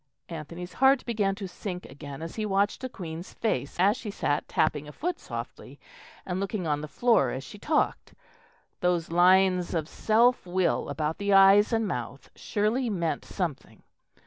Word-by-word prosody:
Anthony's 170 +2 -7
heart 270 0 +5
began 210 -5 0
to 195 -1 -6
sink 180 0 -6
again 140 +1 -9
as 165 - -6
he 220 - -3
watched 200 0 +1
the 255 - -4
Queen's 170 -5 -8
face 140 - -2
as 200 +4 +4
she 230 - -7
sat 145 -7 -1
tapping 150 -1 0
a - - -8
foot 350 - -3
softly - - -8 0.5
and 180 0 -3
looking 195 -1 -3
on 150 -2 0
the 155 - -5
floor 190 - +3
as 130 +2 -4
she 205 - -11
talked. 300 +7 -1 0.6
Those 175 -2 0
lines 180 0 +4
of 160 -2 -1
self 230 +3 +2
will 185 0 0
about 155 +2 -2
the 200 0 +1
eyes 195 +2 +7
and 225 -2 +1
mouth 125 - -5
surely 225 +4 0
meant 170 -6 -1
something. 175 -8 -5
185 Hz, 170 wpm, -27 LUFS, 160-210 Hz, 0.6 s, eyes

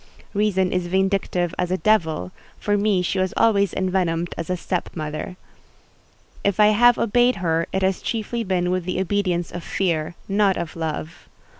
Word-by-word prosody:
Reason 200 -3 +1
is 180 -1 -1
vindictive 190 -2 0
as 180 -1 0
a 185 - 0
devil: 160 - +1 0.3
for 205 - 0
me 200 -3 +2
she 190 +2 -1
was 185 0 -1
always 200 -4 +3
envenomed 180 -3 -1
as 165 - -5
a 180 - 0
step 180 0 -3
mother. 155 +2 -5 1.1
If 200 +1 0
I 210 0 +7
have 240 +3 +5
obeyed 245 +3 +3
her 165 -3 0
it 190 - -1
has 190 0 +1
chiefly 230 +1 -2
been 180 -3 0
with 185 -1 -1
the 185 0 -2
obedience 185 -3 0
of 175 - -6
fear, 170 -4 -1
not 200 -1 +2
of 165 - -5
love. 160 0 -5
185 Hz, 170 wpm, -22 LUFS, 175-200 Hz, 1.1 s, I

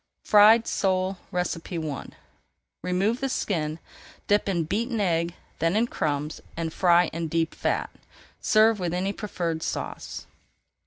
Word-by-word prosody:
FRIED 215 +2 +7
SOLE 185 -1 0
I 165 -4 -3 0.7
Remove 195 +7 0
the 270 - 0
skin, 155 -10 -1 0.5
dip 205 0 +2
in 170 -4 +1
beaten 225 +8 -1
egg, 170 -3 0 0.2
then 165 +3 +1
in 225 +2 +3
crumbs, 150 -7 -2 0.2
and 165 -1 -3
fry 175 -2 +4
in 165 0 -2
deep 165 0 0
fat. - - -1 0.5
Serve 215 0 +4
with 175 -1 -1
any 190 +2 -1
preferred 170 -7 -3
sauce. - - -5
180 Hz, 125 wpm, -26 LUFS, 165-205 Hz, 0.7 s, FRIED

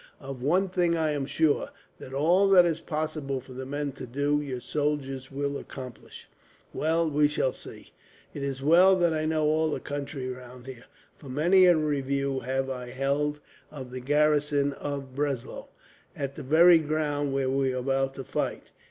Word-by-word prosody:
Of 135 -2 -8
one 180 +9 +2
thing 175 -2 +1
I 160 -1 +1
am 140 -2 -2
sure, 155 -1 +1 0.3
that 130 - -10
all 175 +8 +3
that 180 -2 +7
is 165 -2 0
possible 155 -4 -3
for 130 0 -13
the 130 +1 -7
men 145 +1 -3
to 130 - -9
do, 145 +4 0
your 135 -4 -5
soldiers 135 -1 -2
will 140 +1 -2
accomplish." 130 -3 -10 0.5
"Well, 165 +2 +1
we 150 -1 +3
shall 140 -3 0
see. - - -12 0.4
It 145 - -6
is 135 -1 -4
well 180 +6 +6
that 175 -3 +2
I 155 0 -1
know 155 -1 +1
all 155 +1 +2
the - - -2
country 140 -2 -5
round 125 -1 -9
here, 130 -3 -10 0.3
for 140 - -11
many 175 +8 +4
a 175 -2 +6
review 140 -2 -1
have 130 +2 -2
I 125 -2 -5
held 140 +3 -1 0.3
of 130 -4 -9
the 130 - -5
garrison 145 0 +2
of 140 -2 -6
Breslau, 140 -3 -3 0.5
on 140 -1 -3
the 150 - -8
very 165 +5 +6
ground 150 -2 -1
where 135 -1 0
we 135 -1 +1
are 130 - -3
about 135 +1 -1
to 135 - -6
fight. - - -4
145 Hz, 180 wpm, -27 LUFS, 135-155 Hz, 0.5 s, that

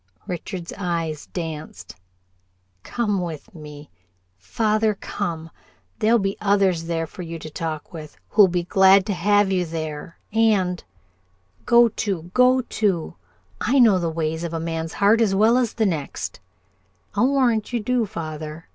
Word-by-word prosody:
Richard's 175 0 -6
eyes 165 -5 -3
danced. 160 -3 -7 0.9
"Come 210 - -1
with 165 -4 -7
me, 150 -2 -11 0.4
father, 215 - 0
come. 165 -5 -5 0.5
There'll 225 +2 +4
be 195 -2 -2
others 195 -5 +2
there 165 -1 -2
for 170 - -10
you 165 -1 -6
to 155 -1 -9
talk 160 +2 -5
with 155 -2 -9
who'll 205 -2 +6
be 175 -1 -1
glad 190 +2 +5
to 210 - -1
have 205 +2 +2
you 185 -1 +1
there, 160 0 -6 0.2
and 205 -6 +2 0.4
" 95 +1 -38
"Go 235 0 +6
to, 195 -6 -4
go 255 +1 +4
to! 200 -8 -1 0.5
I 255 +6 +2
know 220 -7 +6
the 170 -1 -1
ways 160 0 -2
of 170 -1 -4
a - - -2
man's 165 0 -4
heart 210 +3 +3
as 200 -4 +2
well 220 +4 +4
as 245 -3 +1
the 225 - 0
next." 160 -8 -3 0.7
"I'll 225 +5 +3
warrant 245 -6 +1
you 240 - 0
do, 235 +1 0
father!" 155 -1 -7
180 Hz, 155 wpm, -22 LUFS, 160-215 Hz, 0.9 s, who'll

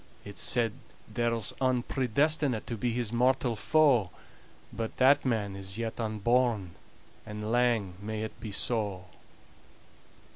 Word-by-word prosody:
It's 100 - -5
said 115 -4 +2 0.3
there's 115 -3 0
ane 130 -2 +2
predestinate 135 0 +1
To 120 - -4
be 120 +2 -1
his 120 -1 -2
mortal 125 0 +2
foe; 120 -1 +3 0.6
But 115 -1 -4
that 135 +2 +5
man 105 -6 0
is 95 +1 -6
yet 115 0 -4
unborn 110 -2 +1 0.5
And 105 +1 -5
lang 120 -6 +2
may 110 +1 -4
it 110 - -7
be 110 - -6
so." 100 -3 -1
115 Hz, 125 wpm, -29 LUFS, 105-125 Hz, 0.6 s, that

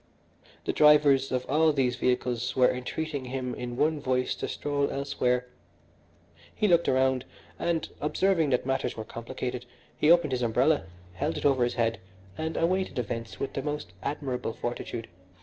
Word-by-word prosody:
The - - 0
drivers 150 -3 +5
of 125 -1 -1
all 155 +3 +4
these 130 -4 +1
vehicles 125 0 0
were 125 -1 +5
entreating 140 +2 -4
him 125 0 -3
in 120 0 -5
one 155 +1 +2
voice 130 -2 0
to - - -4
stroll 145 -1 -1
elsewhere. 125 -3 0 1.1
He 210 - +2
looked 170 -2 +4
around 130 -1 +2 0.4
and, 170 -2 0
observing 165 +1 +2
that 125 -2 +1
matters 135 -3 -1
were 110 - -5
complicated, 125 +2 -5 0.3
he 150 - +2
opened 170 -4 +5
his 125 -1 -1
umbrella, 125 - +2 0.3
held 145 - -2
it - - -4
over 135 -3 +4
his 120 - 0
head, 115 -3 0 0.4
and 160 0 -3
awaited 185 +1 0
events 115 -1 -4
with 135 - -3
the 135 - -2
most 150 -9 -4
admirable 135 -3 -3
fortitude. 120 -1 -4
130 Hz, 160 wpm, -28 LUFS, 125-150 Hz, 1.1 s, drivers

